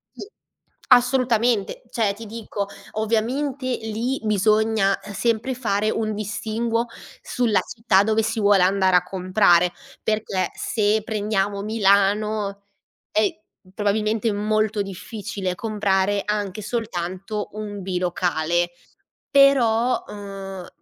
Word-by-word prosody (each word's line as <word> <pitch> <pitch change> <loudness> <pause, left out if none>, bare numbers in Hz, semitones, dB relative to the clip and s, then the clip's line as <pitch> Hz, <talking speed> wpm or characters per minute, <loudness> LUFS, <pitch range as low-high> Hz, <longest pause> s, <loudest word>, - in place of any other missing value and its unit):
Sì. - - -8 0.6
Assolutamente! 245 - +3
Cioè, 215 -4 0
ti 225 +3 -10
dico 210 -2 -5 0.2
ovviamente 245 +6 -1 0.2
lì 225 +5 -2
bisogna 215 -1 +2 0.2
sempre 230 +5 0
fare 215 -4 0
un 220 -1 -1
distinguo 220 +3 -2 0.4
sulla 235 -4 +1
città 225 -4 +2
dove 220 +1 +1
si 225 +1 -1
vuole 200 -3 +5
andare 190 0 +3
a 180 - +5
comprare. 180 -2 +3 0.3
Perché 205 -4 -1
se 215 -1 +1
prendiamo 205 -2 -1
Milano 205 -1 +1 0.5
è 215 -1 +3 0.5
probabilmente 215 +2 0
molto 215 0 0
difficile 195 -1 -5
comprare 205 -2 0
anche 210 -1 -2
soltanto 210 -2 -4
un 205 -2 -6
bilocale. 175 -2 0 0.6
Però, 255 -4 +4
ehm, 195 -2 -7
210 Hz, 100 wpm, -23 LUFS, 195-225 Hz, 0.6 s, vuole